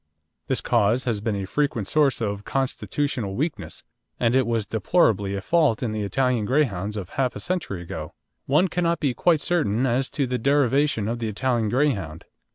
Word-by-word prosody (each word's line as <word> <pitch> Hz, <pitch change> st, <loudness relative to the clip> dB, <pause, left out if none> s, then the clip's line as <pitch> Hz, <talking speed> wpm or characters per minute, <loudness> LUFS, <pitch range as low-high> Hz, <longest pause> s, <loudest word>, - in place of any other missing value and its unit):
This -, -, 0 dB
cause 110 Hz, +5 st, +2 dB
has 115 Hz, -5 st, -1 dB
been 110 Hz, -1 st, -1 dB
a 100 Hz, -1 st, -3 dB
frequent 120 Hz, -3 st, -1 dB
source 140 Hz, -4 st, +2 dB
of 100 Hz, -2 st, -2 dB
constitutional 135 Hz, -5 st, -2 dB
weakness, 155 Hz, +5 st, -4 dB, 0.4 s
and 120 Hz, +1 st, +2 dB
it 130 Hz, -3 st, +3 dB
was 115 Hz, -3 st, 0 dB
deplorably 105 Hz, -, +1 dB
a 100 Hz, -, -3 dB
fault 155 Hz, -, +2 dB
in 115 Hz, -, -1 dB
the 110 Hz, 0 st, -3 dB
Italian 120 Hz, +2 st, 0 dB
Greyhounds 105 Hz, -7 st, 0 dB
of 95 Hz, -4 st, -5 dB
half 130 Hz, -3 st, -1 dB
a -, -, -5 dB
century 165 Hz, -, -3 dB
ago. 85 Hz, -4 st, -7 dB, 0.3 s
One 150 Hz, +7 st, +3 dB
cannot 170 Hz, -2 st, 0 dB
be 140 Hz, -4 st, 0 dB
quite 160 Hz, +4 st, +2 dB
certain 130 Hz, -, +1 dB
as 130 Hz, +2 st, 0 dB
to 140 Hz, -, +2 dB
the 125 Hz, 0 st, -2 dB
derivation 140 Hz, -3 st, +2 dB
of 115 Hz, +1 st, -2 dB
the 115 Hz, -, -2 dB
Italian 115 Hz, +1 st, 0 dB
Greyhound. 100 Hz, -, -1 dB
120 Hz, 180 wpm, -24 LUFS, 105-140 Hz, 0.4 s, it